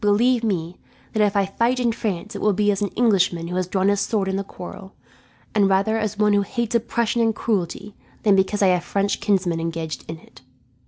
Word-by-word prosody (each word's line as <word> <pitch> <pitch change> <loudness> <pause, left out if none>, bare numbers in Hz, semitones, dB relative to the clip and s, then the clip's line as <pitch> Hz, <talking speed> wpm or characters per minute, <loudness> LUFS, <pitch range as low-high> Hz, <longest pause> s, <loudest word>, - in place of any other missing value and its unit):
Believe 235 +4 +3
me, 180 -5 -2 0.4
that 215 - +1
if 205 0 +1
I 200 -1 +3
fight 235 +6 0
in 240 -2 +2
France 215 -1 -4
it - - -5
will 210 - +3
be 205 +2 +2
as 200 0 -2
an 205 - +1
Englishman 185 -7 +2
who 180 - -4
has 185 -1 -1
drawn 190 +1 0
his 200 0 +2
sword 200 -2 0
in 190 - -1
the 195 - -1
quarrel, 190 +1 -10 0.6
and 200 -2 +3
rather 195 +3 +2
as 215 -2 -2
one 210 0 +3
who 205 - +4
hates 235 +2 -3
oppression 235 0 0
and 225 -1 +2
cruelty 205 -1 -2 0.3
than 205 -2 +5
because 195 +2 +1
I 190 - +5
have 180 -1 +2
French 200 +2 -1
kinsmen 190 -5 +1
engaged 165 -1 -4
in 160 - -5
it." - - -19
200 Hz, 220 wpm, -22 LUFS, 190-220 Hz, 0.6 s, than